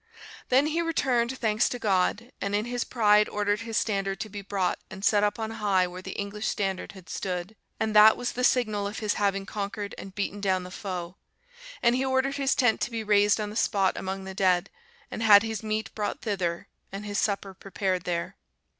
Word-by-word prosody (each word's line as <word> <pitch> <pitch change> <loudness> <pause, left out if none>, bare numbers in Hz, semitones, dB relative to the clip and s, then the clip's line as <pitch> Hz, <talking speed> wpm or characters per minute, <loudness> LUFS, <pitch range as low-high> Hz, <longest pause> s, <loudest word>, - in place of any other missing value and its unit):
Then 265 +3 +4
he 315 +2 0
returned 260 -6 0
thanks 220 -2 +1
to 245 - -3
God, 210 +3 0
and 200 +1 -1
in 210 +2 0
his 245 0 -2
pride 210 -3 +3
ordered 205 0 0
his 225 -1 -3
standard 195 -2 -1
to 215 - -4
be 205 0 -7
brought 195 -2 -1
and 195 +2 -6
set 205 -1 +4
up 205 0 +1
on 220 -1 -3
high 200 -4 +2
where 180 +1 -7
the - - -7
English 205 +1 -3
standard 195 -2 -2
had 190 -3 -14
stood; 185 +2 -4 0.2
and 220 -1 -1
that 215 +1 +8
was 245 - -2
the 250 - -3
signal 215 -5 +2
of 205 - -6
his 210 -2 0
having 195 -1 +1
conquered 205 0 -4
and 195 0 -9
beaten 205 0 -3
down 190 -2 +1
the 180 - -9
foe. 180 -2 -5 0.7
And 235 0 +4
he 260 - 0
ordered 265 +1 +1
his 275 -1 +1
tent 245 -4 +2
to - - 0
be 230 -2 -4
raised 205 0 +4
on 210 -1 -3
the - - -9
spot 195 -4 +2
among 190 0 -4
the 190 0 -7
dead, 185 -2 +2 0.4
and - - -5
had 210 -1 +8
his 225 -1 -3
meat 215 -3 -3
brought 210 -1 -3
thither, 185 -6 -2 0.2
and 200 +2 -6
his 205 -1 -2
supper 200 -2 -1
prepared 190 -1 -2
there. 170 -1 -3
205 Hz, 210 wpm, -27 LUFS, 195-225 Hz, 0.7 s, that